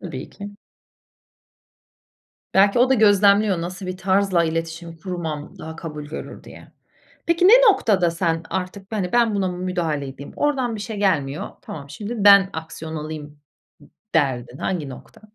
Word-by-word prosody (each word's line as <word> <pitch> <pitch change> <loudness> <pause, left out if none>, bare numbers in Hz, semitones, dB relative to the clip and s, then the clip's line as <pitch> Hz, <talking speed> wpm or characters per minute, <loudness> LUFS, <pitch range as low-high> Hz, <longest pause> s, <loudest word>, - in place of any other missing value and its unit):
Tabii 155 -7 -7
ki. 205 0 -10 2.0
Belki 200 +4 +5
o 255 +2 +4
da - - +6
gözlemliyor 205 -3 +4
nasıl 180 +3 -6
bir 185 0 -4
tarzla 190 -2 +2
iletişim 165 +1 -4
kurmam 160 -4 -6
daha 160 0 -8
kabul 150 -3 -7
görür 150 +2 -8
diye. - - -14 0.5
Peki, 340 +2 +4
ne - - +8 0.2
noktada 190 - +1
sen 165 -1 -1
artık, 190 +2 -5
hani, 190 -4 -2
ben 235 -3 +3
buna 190 -2 0
müdahale 175 -6 -2
edeyim, 140 +1 -10
oradan 265 -5 0
bir - - -7
şey 215 +1 -5
gelmiyor. 155 -7 0
Tamam 140 -2 -9
şimdi 215 +7 -6
ben 200 -2 +7
aksiyon 160 0 -7
alayım 150 -1 -7 0.4
d 145 - -18 0.3
derdin. 130 -5 0
Hangi 170 -7 -2
nokta? 130 +7 -12
180 Hz, 150 wpm, -22 LUFS, 160-200 Hz, 2.0 s, ne